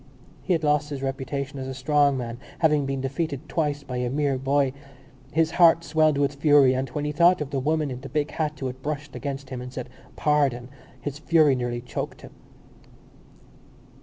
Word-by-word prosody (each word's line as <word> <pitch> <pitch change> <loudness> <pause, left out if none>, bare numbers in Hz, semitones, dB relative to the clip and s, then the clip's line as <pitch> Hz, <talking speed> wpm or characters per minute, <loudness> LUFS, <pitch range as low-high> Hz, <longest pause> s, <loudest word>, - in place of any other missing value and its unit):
He 185 - 0
had 160 -2 0
lost 150 0 +2
his 140 -2 -5
reputation 135 +1 -3
as 130 - -5
a 130 - -5
strong 140 +1 +2
man, 120 -1 -5 0.2
having 150 -4 +2
been 135 -1 -2
defeated 140 +2 -3
twice 145 -3 -1
by 130 -2 -5
a 125 0 -1
mere 140 0 0
boy. 135 0 +1 0.6
His 160 +1 +2
heart 170 -1 +5
swelled 155 -1 +2
with 140 0 +1
fury 140 -2 +5
and, 130 0 -2
when 145 +4 -3
he 150 - -1
thought 170 +4 +4
of 150 -2 -4
the 140 - 0
woman 155 +1 0
in 125 0 -6
the 135 - -8
big 150 -1 -1
hat 155 -1 -2
who 135 - -4
had 130 0 -5
brushed 150 -1 -4
against 135 +1 -5
him 125 -1 -4
and 125 0 -7
said 130 -1 -6 0.3
Pardon! 135 -5 +1 0.3
his 145 0 -5
fury 155 -3 +4
nearly 120 -1 -3
choked 125 - -5
him. - - -11
140 Hz, 195 wpm, -25 LUFS, 130-150 Hz, 0.6 s, heart